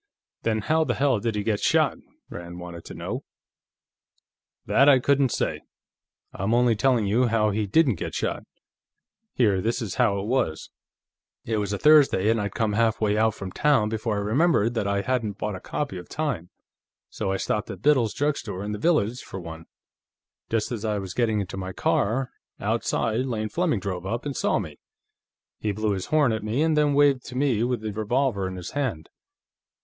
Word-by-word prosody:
"Then 110 -1 0
how 160 +8 +2
the 125 -5 -1
hell 135 -5 +2
did 115 0 -2
he 105 - -1
get 105 -1 0
shot?" - - +2 0.3
Rand 85 0 -8
wanted 85 -1 -9
to - - -9
know. - - -5 1.4
"That 140 +2 +5
I 135 - +7
couldn't 140 +1 +2
say; - - -2 0.7
I'm 105 +5 0
only 120 -1 +4
telling 120 0 +2
you 115 +5 +2
how 110 -2 +2
he 105 0 -1
didn't 125 - +3
get - - -4
shot. - - -2 0.9
Here, 105 -6 +3
this 115 +5 -1
is 110 -7 -4
how 105 -5 +3
it 100 - -4
was. 110 -10 -1 0.7
It 110 -1 -1
was 100 -1 -1
a 100 - -1
Thursday, 145 -8 +5
and 115 -1 +1
I'd 100 -1 -4
come 110 -2 0
halfway 110 -1 +2
out 110 0 +2
from 95 -1 -7
town 135 -6 +2
before 110 0 -2
I - - -1
remembered 120 +1 +2
that 110 -4 -1
I 100 0 0
hadn't 115 -5 -1
bought 105 - -3
a - - -7
copy 135 -3 -4
of 90 - -12
Time, 130 - -3 0.6
so 100 -3 -2
I 95 - 0
stopped 105 +2 -2
at - - -8
Biddle's 130 -7 +3
drugstore, 120 -10 -2
in 105 - -4
the 105 - -4
village, 125 -5 +1
for 95 - -8
one. 80 -1 -9 0.8
Just 110 0 -1
as 115 -3 -4
I 105 -2 0
was 95 -2 -5
getting 110 -3 +1
into 95 0 -6
my 95 0 -5
car, 125 +9 0 0.3
outside, 115 +4 0
Lane 110 -3 -2
Fleming 165 - 0
drove 95 -1 -4
up 115 +6 -3
and 140 -2 -3
saw - - +1
me. 80 -8 -6 0.8
He 105 - -1
blew 110 +1 -1
his 95 -2 -3
horn 150 -5 +3
at 110 - -2
me, 115 +8 0
and 160 -1 +2
then 150 -1 +3
waved 140 -3 +4
to 125 - -8
me 130 -5 +1
with 125 -1 -1
this 110 -2 -5
revolver 110 -2 0
in 95 - -6
his 90 -1 -7
hand. 125 - -2
110 Hz, 195 wpm, -25 LUFS, 100-130 Hz, 1.4 s, I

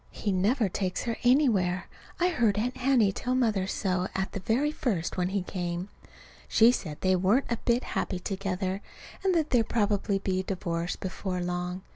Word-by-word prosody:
He 205 - -3
never 210 +5 +2
takes 185 0 -2
her 230 -1 -2
anywhere. 225 -9 +3 0.3
I 355 +1 +3
heard 230 - +2
Aunt 250 +4 -1
Hattie 250 -6 +3
tell 250 +6 -2
Mother 215 -7 +1
so 185 -2 -1
at 190 0 -1
the - - -4
very 250 +10 +1
first, 220 - -2
when 180 -1 0
he 195 -1 -1
came. 180 0 -4 0.6
She 230 +2 +6
said 155 -11 -4
they 185 0 +3
weren't 200 +9 +2
a 235 - +1
bit 240 +1 +2
happy 185 - -2
together, 190 0 -3 0.4
and 380 -2 +2
that 315 -2 +1
there'd 235 -3 +3
probably 205 -2 +1
be 190 -1 -1
a - - -1
divorce 175 -2 -2
before 185 0 -4
long. 180 +1 -3
195 Hz, 180 wpm, -28 LUFS, 185-240 Hz, 0.6 s, She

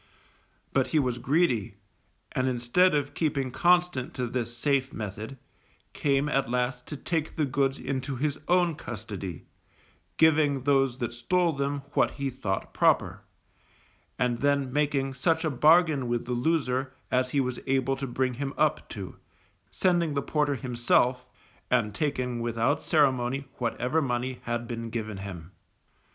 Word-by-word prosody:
But 135 - +2
he 160 - 0
was 125 -4 +1
greedy, 125 - +1 0.6
and 130 0 0
instead 130 +8 +3
of 145 -1 -1
keeping 140 -5 -1
constant 175 -4 +2
to 125 - -1
this 120 -1 -3
safe 135 0 +1
method, 110 +4 -6 0.6
came 140 0 +1
at 135 -4 0
last 125 0 -1
to 150 - -5
take 160 +1 -2
the 155 - +1
goods 135 0 0
into 135 0 -3
his 145 +2 -1
own 175 -1 +3
custody, 105 - -7 0.7
giving 150 -4 +4
those 135 -3 +2
that 120 -2 -3
stole 170 +8 +1
them 140 0 -2
what - - +3
he 140 -1 -2
thought 105 -7 -3
proper, - - +2 1.0
and 120 -1 0
then 140 -2 +1
making 140 -2 +1
such 160 +5 +1
a 155 - +1
bargain 155 0 +4
with 120 0 -1
the 125 - -2
loser 130 -1 0 0.2
as 130 0 +2
he 140 - 0
was 125 -2 -1
able 135 0 +1
to 135 0 -4
bring 130 +1 0
him 135 +2 -4
up 155 -1 +1
to, 95 -3 -7 0.5
sending 170 -5 +1
the 140 - 0
porter 150 -2 +1
himself, 125 0 +1 0.4
and 115 -4 +2
taking 125 -1 -1
without 115 +5 0
ceremony 135 -3 +1
whatever 125 +5 0
money 125 -1 -2
had 120 0 -2
been 115 -1 -5
given 110 -3 -4
him. 95 -3 -8
130 Hz, 150 wpm, -27 LUFS, 120-145 Hz, 1.0 s, giving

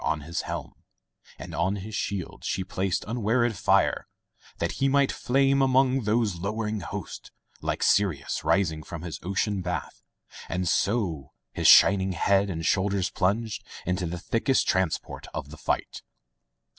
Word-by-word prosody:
On 75 +1 0
his 85 +4 -3
helm - - -5 0.6
And - - -9
on 95 +4 0
his 105 +2 -7
shield 100 -4 -4
she 95 - -1
placed 95 0 -2
unwearied 115 +1 +1
fire, - - +2 0.5
That 85 - -1
he 135 - +4
might 140 0 +3
flame 135 +2 +2
among 130 -2 +3
those 105 -3 +1
lowering 105 +3 -2
hosts. 90 - -7 0.3
Like - - -2
Sirius 95 -9 +1
rising 80 -6 +1
from 80 +1 -8
his 85 -3 -6
ocean 100 +2 -1
bath. 90 0 -4 0.5
And 90 0 -1
so 90 - 0 0.2
his - - +1
shining 95 -1 +7
head 100 +3 +2
and 80 -3 -4
shoulders 95 0 +1
plunged 105 +4 -1 0.2
Into 90 0 -1
the 85 +2 -4
thickest 115 +8 +1
transport 95 -3 -1
of 70 - -5
the 80 - -10
fight. - - -2
95 Hz, 145 wpm, -26 LUFS, 90-110 Hz, 0.6 s, shining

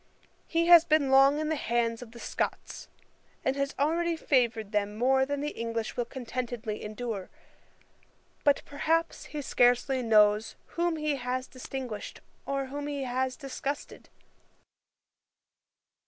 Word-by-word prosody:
He 335 +1 +1
has 340 -1 +9
been 310 -4 +2
long 275 +2 +6
in 310 0 -1
the 315 - +1
hands 235 -3 0
of 240 -2 -10
the 235 - -12
Scots, - - -4 0.6
and 265 - +2
has 275 0 -2
already 335 +4 +1
favoured 235 -8 +1
them 210 0 -1
more 265 +3 +3
than 285 0 -2
the 295 - -1
English 230 0 -3
will 240 - -1
contentedly 245 -3 -5
endure. 215 -2 -5 1.1
But, 285 -1 +3
perhaps, 325 +3 -1
he 295 -1 -6
scarcely 245 +1 +3
knows 215 -2 +4
whom 345 -1 0
he 305 -2 -1
has 255 0 -2
distinguished, 255 -4 -7 0.3
or 275 0 -1
whom 285 +2 -5
he 285 -2 -3
has 255 0 -1
disgusted. 275 0 -6
265 Hz, 135 wpm, -29 LUFS, 235-290 Hz, 1.1 s, has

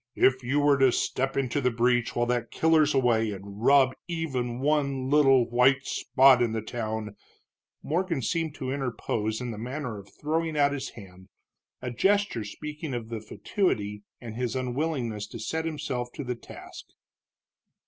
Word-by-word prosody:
"If 130 0 +3
you 130 +4 0
were 145 -1 +4
to 135 -1 +5
step 135 +3 -1
into 135 +1 0
the 125 - +3
breach 120 0 +1
while 120 - +2
that 120 -1 -1
killer's 155 -2 +3
away 115 -4 +3
and 100 +1 -8
rub 135 -1 +5
even 135 -8 -2
one 140 -2 0
little 135 -4 +5
white 130 +3 +3
spot 130 -1 +4
in 115 -2 +1
the 110 - -1
town 110 -2 -4 0.3
" - - -53
Morgan 170 -4 -1
seemed 165 +2 -1
to 130 0 -4
interpose 115 -5 -2
in 125 -1 -4
the 105 - -7
manner 125 -2 -4
of 100 - -14
throwing 160 +1 -1
out 140 -1 +4
his 140 - -4
hand, 95 -3 -13 0.5
a 125 - -3
gesture 195 - +1
speaking 150 +6 -6
of 115 -2 -5
the 115 -2 -5
fatuity 105 - -2 0.2
and 115 -3 -8
his 125 +1 -2
unwillingness 125 -5 -2
to - - -9
set 160 +8 -2
himself 130 -6 -3
to 145 - -5
the 125 -1 -2
task. - - -11
125 Hz, 170 wpm, -27 LUFS, 115-145 Hz, 0.5 s, to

